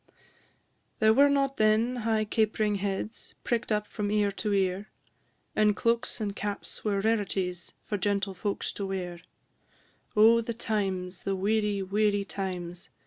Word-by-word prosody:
II. -, -, -32 dB, 0.8 s
There 220 Hz, 0 st, +5 dB
were 280 Hz, +4 st, +6 dB
not 275 Hz, -1 st, +1 dB
then 220 Hz, +3 st, +3 dB
high 220 Hz, -2 st, +1 dB
capering 215 Hz, -1 st, +1 dB
heads, 200 Hz, +2 st, -4 dB
Prick'd 235 Hz, -2 st, -1 dB
up 210 Hz, 0 st, +1 dB
from 210 Hz, -1 st, -3 dB
ear 205 Hz, -1 st, +2 dB
to 210 Hz, +2 st, -3 dB
ear; 195 Hz, 0 st, 0 dB, 0.7 s
And 210 Hz, -1 st, +4 dB
cloaks 235 Hz, +2 st, 0 dB
and 205 Hz, -2 st, -3 dB
caps 205 Hz, 0 st, -5 dB
were 200 Hz, -2 st, 0 dB
rarities, 195 Hz, -5 st, -1 dB
For 205 Hz, -, -2 dB
gentle 200 Hz, 0 st, 0 dB
folks 200 Hz, +2 st, -3 dB
to 200 Hz, -, -4 dB
wear: 180 Hz, -3 st, -4 dB, 1.0 s
Oh, 225 Hz, +2 st, +7 dB
the 230 Hz, 0 st, -4 dB
times, 190 Hz, -5 st, -2 dB
the 195 Hz, -, -1 dB
weary, 205 Hz, 0 st, +1 dB
weary 205 Hz, +1 st, +1 dB
times! 180 Hz, -1 st, -5 dB
205 Hz, 145 wpm, -28 LUFS, 195-220 Hz, 1.0 s, Oh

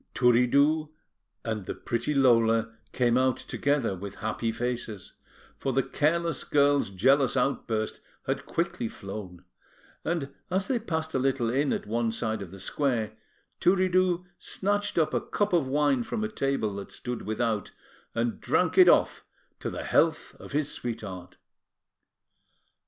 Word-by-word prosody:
Turiddu 140 Hz, +6 st, +4 dB, 0.6 s
and 110 Hz, -4 st, -3 dB
the -, -, -3 dB
pretty 120 Hz, +5 st, -2 dB
Lola 115 Hz, -3 st, +4 dB, 0.2 s
came 125 Hz, 0 st, +2 dB
out 130 Hz, -1 st, +2 dB
together 140 Hz, -7 st, 0 dB
with 100 Hz, +2 st, -7 dB
happy 115 Hz, +1 st, -2 dB
faces, 115 Hz, -4 st, -4 dB, 0.5 s
for 135 Hz, -, -1 dB
the 135 Hz, +1 st, +2 dB
careless 165 Hz, +2 st, 0 dB
girl's 145 Hz, -4 st, +3 dB
jealous 130 Hz, +7 st, +3 dB
outburst 115 Hz, -4 st, -1 dB, 0.2 s
had -, -, -2 dB
quickly 115 Hz, -, -1 dB
flown; 95 Hz, -4 st, -8 dB, 0.6 s
and 155 Hz, -5 st, -2 dB, 0.2 s
as 190 Hz, +1 st, 0 dB
they 255 Hz, -3 st, +1 dB
passed 160 Hz, -7 st, -3 dB
a -, -, +1 dB
little 130 Hz, -3 st, +1 dB
inn 140 Hz, +3 st, +1 dB
at -, -, -2 dB
one 115 Hz, +2 st, 0 dB
side 110 Hz, -1 st, -2 dB
of 95 Hz, -, -7 dB
the 95 Hz, +2 st, -11 dB
square, 115 Hz, 0 st, -1 dB, 0.5 s
Turiddu 185 Hz, -1 st, +3 dB
snatched 205 Hz, 0 st, -1 dB
up 160 Hz, -2 st, +2 dB
a -, -, +1 dB
cup 205 Hz, -2 st, -1 dB
of 165 Hz, -6 st, +3 dB
wine 140 Hz, -1 st, +2 dB
from 215 Hz, -, -3 dB
a -, -, 0 dB
table 135 Hz, -, -1 dB
that 100 Hz, -, -7 dB
stood 125 Hz, -1 st, -5 dB
without, 110 Hz, -1 st, -1 dB, 0.5 s
and 115 Hz, 0 st, -1 dB
drank -, -, +2 dB
it -, -, +9 dB
off -, -, +3 dB, 0.4 s
to -, -, -3 dB
the -, -, -5 dB
health -, -, +1 dB
of -, -, -11 dB
his 145 Hz, +1 st, 0 dB
sweetheart. 100 Hz, -9 st, -6 dB
125 Hz, 145 wpm, -28 LUFS, 115-150 Hz, 0.6 s, it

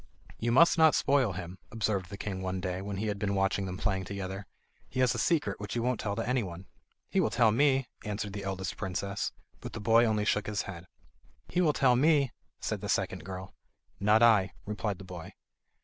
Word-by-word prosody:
"You 120 Hz, +1 st, 0 dB
must 170 Hz, +7 st, +6 dB
not 160 Hz, -1 st, +6 dB
spoil 135 Hz, -7 st, +3 dB
him," 90 Hz, +1 st, -7 dB
observed 100 Hz, -4 st, -1 dB
the 100 Hz, -, -7 dB
king 95 Hz, -2 st, -4 dB
one 95 Hz, 0 st, -2 dB
day, 90 Hz, 0 st, -3 dB
when 100 Hz, 0 st, -4 dB
he 105 Hz, -, -2 dB
had 105 Hz, -2 st, -2 dB
been 100 Hz, 0 st, 0 dB
watching 95 Hz, 0 st, +1 dB
them 90 Hz, 0 st, -5 dB
playing 95 Hz, -1 st, -1 dB
together. 95 Hz, 0 st, -5 dB, 0.4 s
He 130 Hz, -, -4 dB
has 125 Hz, -1 st, +4 dB
a 120 Hz, -, -3 dB
secret 130 Hz, -, +1 dB
which 105 Hz, +1 st, -5 dB
he -, -, +1 dB
won't 125 Hz, +1 st, 0 dB
tell 100 Hz, -2 st, -2 dB
to -, -, -3 dB
anyone." 95 Hz, -8 st, -2 dB, 0.5 s
"He -, -, +2 dB
will -, -, +3 dB
tell 115 Hz, -2 st, +4 dB
me," 135 Hz, +1 st, +3 dB, 0.2 s
answered 105 Hz, -1 st, -4 dB
the 100 Hz, -1 st, -5 dB
eldest 95 Hz, -1 st, -3 dB
princess; 100 Hz, +2 st, -2 dB, 0.3 s
but -, -, -8 dB
the -, -, -5 dB
boy 115 Hz, +3 st, +5 dB
only 105 Hz, -2 st, +1 dB
shook 105 Hz, 0 st, +1 dB
his 105 Hz, -1 st, -1 dB
head. 90 Hz, -2 st, -8 dB, 0.6 s
"He 180 Hz, -, +1 dB
will 160 Hz, -4 st, +4 dB
tell 130 Hz, -3 st, +4 dB
me," 140 Hz, -1 st, +4 dB, 0.3 s
said -, -, -3 dB
the -, -, -5 dB
second -, -, 0 dB
girl. 95 Hz, 0 st, -7 dB, 0.5 s
"Not 105 Hz, +3 st, +4 dB
I," 105 Hz, -5 st, +5 dB
replied 105 Hz, -1 st, -2 dB
the 95 Hz, -, -10 dB
boy. 90 Hz, -3 st, -9 dB
105 Hz, 210 wpm, -30 LUFS, 95-120 Hz, 0.6 s, must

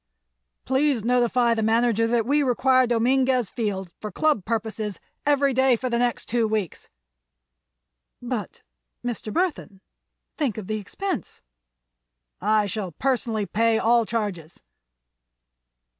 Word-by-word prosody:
"Please 265 Hz, -3 st, +1 dB
notify 240 Hz, 0 st, +2 dB
the 225 Hz, -, -1 dB
manager 230 Hz, 0 st, +2 dB
that 230 Hz, -1 st, +1 dB
we 290 Hz, +4 st, +2 dB
require 255 Hz, -1 st, +3 dB
Dominguez 250 Hz, 0 st, +2 dB
Field, 195 Hz, -6 st, -3 dB
for 210 Hz, -, -6 dB
Club 295 Hz, -2 st, +1 dB
purposes, 220 Hz, -3 st, -3 dB, 0.3 s
every 280 Hz, -2 st, +3 dB
day 260 Hz, 0 st, +4 dB
for 255 Hz, +2 st, -4 dB
the 235 Hz, -, +1 dB
next 245 Hz, -1 st, 0 dB
two 235 Hz, -1 st, +1 dB
weeks." 215 Hz, -6 st, -3 dB, 1.3 s
"But—Mr. -, -, -6 dB
Burthon! 320 Hz, -, -2 dB, 0.6 s
Think 275 Hz, -9 st, -1 dB
of 215 Hz, -, -5 dB
the 215 Hz, +2 st, -2 dB
expense." 360 Hz, -, -5 dB, 1.0 s
"I 215 Hz, +1 st, +2 dB
shall 200 Hz, -3 st, -4 dB
personally 230 Hz, -, -1 dB
pay 225 Hz, +2 st, +2 dB
all 230 Hz, 0 st, +3 dB
charges." 200 Hz, -8 st, -4 dB
230 Hz, 115 wpm, -24 LUFS, 215-255 Hz, 1.3 s, day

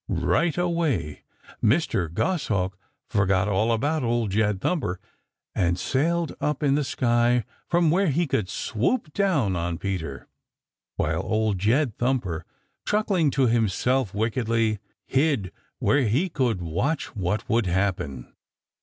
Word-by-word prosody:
Right; 115 Hz, -, +1 dB
away 165 Hz, -, 0 dB, 0.4 s
Mr. 105 Hz, -, +2 dB
Goshawk 100 Hz, -, 0 dB, 0.3 s
forgot 95 Hz, -1 st, +2 dB
all 105 Hz, +3 st, +1 dB
about 145 Hz, +7 st, +1 dB
Old 115 Hz, -3 st, 0 dB
Jed 105 Hz, -1 st, +1 dB
Thumper 95 Hz, -, -1 dB, 0.5 s
and 85 Hz, 0 st, +1 dB
sailed 165 Hz, -, 0 dB
up 150 Hz, 0 st, -1 dB
in 140 Hz, -2 st, +3 dB
the 145 Hz, +1 st, +2 dB
sky 120 Hz, -2 st, +2 dB, 0.2 s
from 170 Hz, -2 st, +3 dB
where 190 Hz, +3 st, +3 dB
he 165 Hz, +4 st, +2 dB
could 110 Hz, -, -1 dB
swoop 150 Hz, -, -1 dB
down 155 Hz, -, +1 dB
on 85 Hz, 0 st, -2 dB
Peter, 85 Hz, -7 st, -4 dB, 0.7 s
while -, -, 0 dB
Old 110 Hz, -3 st, 0 dB
Jed 115 Hz, +4 st, +1 dB
Thumper, 110 Hz, -10 st, -1 dB, 0.4 s
chuckling 200 Hz, -7 st, +2 dB
to 135 Hz, -1 st, +2 dB
himself 120 Hz, +1 st, +1 dB
wickedly, 110 Hz, 0 st, 0 dB, 0.3 s
hid 135 Hz, -, +1 dB, 0.3 s
where 140 Hz, -2 st, +2 dB
he 140 Hz, -, +1 dB
could 120 Hz, -, 0 dB
watch 120 Hz, -, -2 dB
what 100 Hz, +1 st, -2 dB
would 115 Hz, -3 st, +1 dB
happen. 90 Hz, -9 st, -2 dB
115 Hz, 130 wpm, -25 LUFS, 95-150 Hz, 0.7 s, in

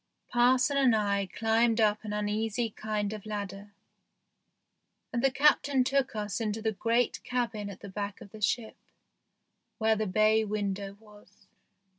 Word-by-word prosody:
Parson 255 Hz, +3 st, +3 dB
and 260 Hz, -4 st, +4 dB
I 200 Hz, -2 st, 0 dB
climbed 225 Hz, +3 st, +1 dB
up 210 Hz, -1 st, +2 dB
an 210 Hz, -, -5 dB
uneasy 215 Hz, +2 st, -1 dB
kind 210 Hz, -1 st, -3 dB
of 210 Hz, -2 st, -7 dB
ladder, 205 Hz, -1 st, -6 dB, 1.4 s
and 235 Hz, -, -1 dB
the 270 Hz, -, +5 dB
Captain 275 Hz, 0 st, +3 dB
took 270 Hz, -1 st, 0 dB
us 210 Hz, +1 st, -3 dB
into 215 Hz, 0 st, -2 dB
the 220 Hz, 0 st, 0 dB
great 230 Hz, +3 st, 0 dB
cabin 230 Hz, -5 st, -2 dB
at 200 Hz, -, -10 dB
the -, -, -8 dB
back 200 Hz, +1 st, -5 dB
of 200 Hz, -, -13 dB
the 215 Hz, -, -11 dB
ship, 220 Hz, +3 st, -1 dB, 1.0 s
where 220 Hz, 0 st, +3 dB
the 215 Hz, 0 st, -1 dB
bay 215 Hz, +3 st, +3 dB
window 200 Hz, -2 st, -3 dB
was. 210 Hz, -2 st, -19 dB
215 Hz, 150 wpm, -29 LUFS, 205-235 Hz, 1.4 s, the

